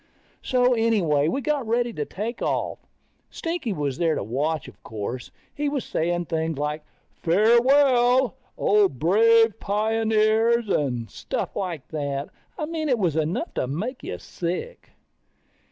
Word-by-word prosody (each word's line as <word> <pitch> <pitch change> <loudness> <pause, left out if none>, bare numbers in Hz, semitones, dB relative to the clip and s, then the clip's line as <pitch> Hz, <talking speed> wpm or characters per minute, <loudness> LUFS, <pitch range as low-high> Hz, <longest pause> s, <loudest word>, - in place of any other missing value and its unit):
So 250 -1 +2
anyway, 195 -11 +2
we 270 - -1
got 280 -2 -1
ready 235 +1 0
to 150 - -3
take 225 - -5
off. - - -1 0.5
Stinky 330 -8 -3
was 145 -7 -2
there 165 -2 +2
to - - -2
watch, 145 +8 -2
of - - -14
course. 110 +3 -6 0.2
He 295 0 -1
was 285 -3 -3
saying 175 +2 -1
things 160 -2 -2
like, 150 +1 -2 0.3
farewell, 245 - +4 0.2
O 205 -1 +4
brave 225 - +4
pioneers, 220 +2 +2
and 125 -9 0
stuff - - -4
like 175 -7 -4
that. 140 -2 -3 0.3
I 305 - -2
mean 315 -1 -3
it 250 - +3
was 175 -8 0
enough 160 - -1
to - - -1
make 220 - -4
you - - -5
sick. 185 - -5
210 Hz, 140 wpm, -24 LUFS, 155-240 Hz, 0.5 s, farewell